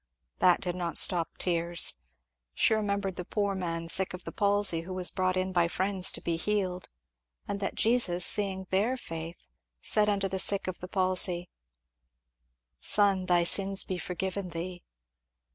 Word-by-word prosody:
That 180 -1 +3
did 180 -2 -3
not 175 -3 -3
stop 170 -3 +4
tears. 170 - +1 0.5
She - - +2
remembered 200 -3 -2
the 180 - -4
poor 200 +2 -2
man 165 -3 -4
sick 185 +2 +2
of 180 - -11
the - - -7
palsy 205 -5 +2
who 185 +2 -8
was 180 -1 -1
brought 185 -1 -1
in 185 0 -2
by 175 -1 +2
friends 190 +1 +3
to - - -7
be 170 -1 -2
healed, 185 -1 -2 0.6
and 200 - -4
that 200 - -4
"Jesus 220 -7 +1
seeing 190 -2 0
their 215 +7 0
faith, 165 -5 -8 0.3
said 210 - +2
unto 200 -1 0
the 190 0 -3
sick 200 +1 +3
of 185 - -5
the 180 - -8
palsy, 185 -2 +1 1.3
'Son, 195 - +2
thy 175 -1 +3
sins 195 +2 +3
be 185 -1 -5
forgiven 185 +2 -5
thee.'" 175 +1 -7
185 Hz, 160 wpm, -28 LUFS, 175-200 Hz, 1.3 s, stop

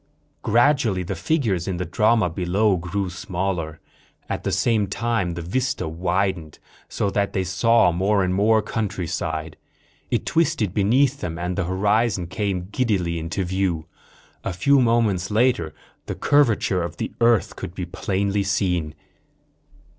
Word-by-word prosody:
Gradually, 120 -5 +2
the 90 - -4
figures 115 - 0
in 95 -2 -2
the 90 - -2
drama 110 +4 +2
below 95 +4 +1
grew 90 +3 -2
smaller. 90 -3 -3 0.5
At - - -3
the - - -1
same 110 -4 +2
time 100 -4 -1
the 85 - -5
vista 125 +4 -1
widened, 85 -1 -1 0.3
so 100 - -1
that 100 0 0
they 95 - 0
saw 95 +2 +3
more 95 +3 +1
and 90 0 0
more 110 +3 +3
countryside. 85 -7 -3 0.5
It - - -1
twisted 155 - +1
beneath 130 +8 +2
them 85 -2 -4
and 90 +1 -3
the 95 - -1
horizon 100 +1 +1
came 95 0 -3
giddily 95 -9 0
into 85 +4 -3
view. 90 -3 -1 0.6
A 95 - -2
few 140 +9 +3
moments 115 -6 +2
later 110 -7 +2 0.4
the - - -3
curvature 120 -10 +2
of 85 - -5
the - - -3
earth 115 -2 +3
could 85 - -7
be 90 - -3
plainly 100 +3 -1
seen. 90 -5 -1
95 Hz, 145 wpm, -23 LUFS, 90-110 Hz, 0.6 s, saw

